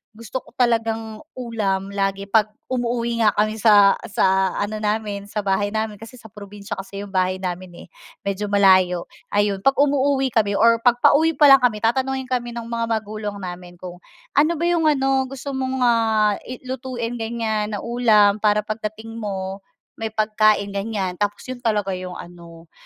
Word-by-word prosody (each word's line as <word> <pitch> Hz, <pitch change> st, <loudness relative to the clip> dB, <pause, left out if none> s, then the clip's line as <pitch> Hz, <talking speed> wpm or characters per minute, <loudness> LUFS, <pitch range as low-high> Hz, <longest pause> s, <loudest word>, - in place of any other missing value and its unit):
gusto 230 Hz, +3 st, -5 dB
ko -, -, -19 dB
talagang 225 Hz, -3 st, 0 dB, 0.2 s
ulam 205 Hz, -6 st, -2 dB
lagi 195 Hz, 0 st, -1 dB
pag 215 Hz, 0 st, +3 dB, 0.2 s
umuuwi 235 Hz, -1 st, -1 dB
nga 210 Hz, -, +4 dB
kami 215 Hz, +1 st, 0 dB
sa 205 Hz, -2 st, +5 dB
sa 190 Hz, -1 st, +1 dB
ano 215 Hz, +1 st, -2 dB
namin 210 Hz, -1 st, -2 dB
sa 210 Hz, 0 st, -4 dB
bahay 205 Hz, +2 st, 0 dB
namin, 220 Hz, -1 st, -2 dB
kasi 225 Hz, +3 st, -11 dB
sa 220 Hz, -4 st, -14 dB
probinsiya 200 Hz, -1 st, -8 dB
kasi 195 Hz, +1 st, -7 dB
yung 200 Hz, -, -10 dB
bahay 185 Hz, -1 st, +1 dB
namin, 180 Hz, 0 st, -5 dB
eh, -, -, -16 dB, 0.4 s
medyo 200 Hz, +1 st, -2 dB
malayo, 185 Hz, -3 st, +4 dB, 0.3 s
ayon 205 Hz, -1 st, +1 dB
'pag 270 Hz, +6 st, +2 dB
umuuwi 275 Hz, -2 st, +2 dB
kami 205 Hz, -3 st, +1 dB
or 230 Hz, +1 st, +4 dB
pag 240 Hz, 0 st, +4 dB
pauwi 320 Hz, +2 st, +4 dB
pa 285 Hz, -1 st, +6 dB
lang 270 Hz, -, +9 dB
kami 230 Hz, -4 st, 0 dB
tatanungin 265 Hz, +2 st, 0 dB
kami 240 Hz, -1 st, -2 dB
ng 235 Hz, -, -5 dB
mga 230 Hz, 0 st, -3 dB
magulang 215 Hz, -1 st, -5 dB
namin 175 Hz, 0 st, -8 dB
kung 175 Hz, 0 st, -10 dB, 0.3 s
ano 305 Hz, +4 st, +3 dB
ba 320 Hz, -, -4 dB
'yong 340 Hz, -2 st, +2 dB
ano, 270 Hz, -2 st, +2 dB
gusto 275 Hz, +1 st, -7 dB
mong 260 Hz, -1 st, -2 dB
ah, 220 Hz, -3 st, +3 dB
i 255 Hz, 0 st, -8 dB
lutuin 250 Hz, -2 st, -5 dB
ganyan 220 Hz, -2 st, -2 dB
na 205 Hz, -, -6 dB
ulam 215 Hz, -4 st, +3 dB
para 210 Hz, 0 st, +2 dB
pagdating 215 Hz, +1 st, -6 dB
mo, 195 Hz, -2 st, -4 dB, 0.4 s
may 220 Hz, -1 st, -4 dB
pagkain 215 Hz, -1 st, +2 dB
ganyan, 195 Hz, -3 st, -3 dB
tapos 205 Hz, 0 st, -2 dB
'yon 255 Hz, -1 st, -7 dB
talaga 210 Hz, -4 st, 0 dB
'yong 185 Hz, -1 st, -5 dB
ano, 170 Hz, -1 st, -12 dB
215 Hz, 175 wpm, -21 LUFS, 200-240 Hz, 0.4 s, lang